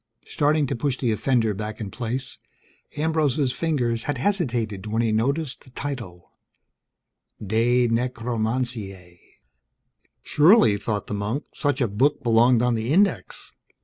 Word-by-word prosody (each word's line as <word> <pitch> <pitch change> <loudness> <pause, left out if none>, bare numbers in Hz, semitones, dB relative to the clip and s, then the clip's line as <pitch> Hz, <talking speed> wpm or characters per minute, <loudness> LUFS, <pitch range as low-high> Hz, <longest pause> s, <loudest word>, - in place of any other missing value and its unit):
Starting 150 0 +1
to - - -2
push 130 +2 -1
the 120 -4 0
offender 110 0 +1
back 105 +2 -6
in 105 -4 -6
place, 125 +2 -4 0.6
Ambrose's 150 -4 +1
fingers 125 -7 -1
had 145 -3 -2
hesitated 120 - -1
when 110 +2 0
he 115 - +1
noticed 135 +6 -1
the 130 - -18
title: 120 -11 -7 1.1
De 115 +4 +2
Necromantiae. 115 -6 -3 1.0
Surely, 150 - +5
thought 105 0 -3
the - - -6
monk, 105 +8 -2
such 145 -2 -1
a 120 - +2
book 125 +9 +1
belonged 120 +1 +4
on 125 -1 +2
the 115 +3 -2
Index. 195 +5 0
120 Hz, 130 wpm, -24 LUFS, 110-140 Hz, 1.1 s, Surely